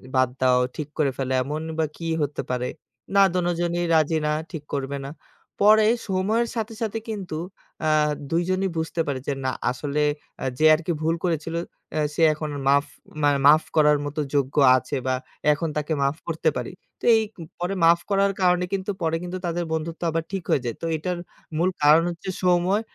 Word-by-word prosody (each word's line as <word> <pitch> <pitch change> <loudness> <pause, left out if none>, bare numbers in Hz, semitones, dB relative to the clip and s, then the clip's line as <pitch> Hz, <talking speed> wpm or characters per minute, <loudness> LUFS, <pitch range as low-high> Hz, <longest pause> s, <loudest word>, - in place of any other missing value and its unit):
বাদ 130 -1 +4
দাও, 125 -1 +4 0.2
ঠিক 150 -2 -4
করে 145 -4 +2
ফেলো। 130 -1 -2
এমনই 155 +4 -4
বা 160 - +3
কি 165 - -5
হতে 145 0 -1
পারে। 125 0 -1 0.5
না 200 - +7
দোনোজনই 175 -1 0
রাজি 160 +1 +3
না 150 - +1 0.2
ঠিক 155 -4 -6
করবে 140 0 -3
না। 140 - -6 0.5
পরে 215 +1 +7 0.2
সময়ের 205 +5 +1
সাথে, 225 0 -3
সাথে 225 0 -1
কিন্তু 190 -7 -4 0.5
আ - - +3 0.4
২ 170 +1 +2
জনই 190 +1 +1
বুঝতে 160 +1 -1
পারে 135 -2 -1
যে, 140 - +1
না, 130 - +1 0.2
আসলে 145 +3 -2 0.4
আ - - -2
যে 155 - +3
আরকি 170 +2 -3
ভুল 165 +1 +1
করেছিল, 165 -1 -1 0.4
আ - - +2
সে 165 - -2
এখন 155 0 -5
আর 140 - -5
মাফ 140 +1 +4 0.4
মানে 145 -1 +4
মাফ 155 +2 +7
করার 150 -1 +5
মত 145 +2 -6 0.2
যোগ্য 135 -1 0 0.2
আছে 130 - -4
বা 130 - +2 0.4
এখন 160 +2 -2
তাকে 150 +1 -1
মাফ 140 +2 +1
করতে 160 -1 +1
পারি। 125 - -4 0.3
তো - - -29
এই 220 - +3 0.4
পরে 180 +3 -1
মাফ 170 +1 +6
করার 200 0 +3
কারণে 180 0 +3
কিন্তু 195 +1 -1
পরে 165 0 +1
কিন্তু 180 +1 -4
তাদের 175 0 -1
বন্ধুত্ব 160 +2 -4
আবার 165 0 -1
ঠিক 190 -3 -3
হয়ে 140 - +3
যায়। 115 - -2
তো - - -3
এটার 180 +3 -3 0.4
মূল 180 +3 +2
কারণ 155 +3 +7
হচ্ছে 175 +3 -6
সময় 180 +4 +3
160 Hz, 190 wpm, -24 LUFS, 145-180 Hz, 0.5 s, না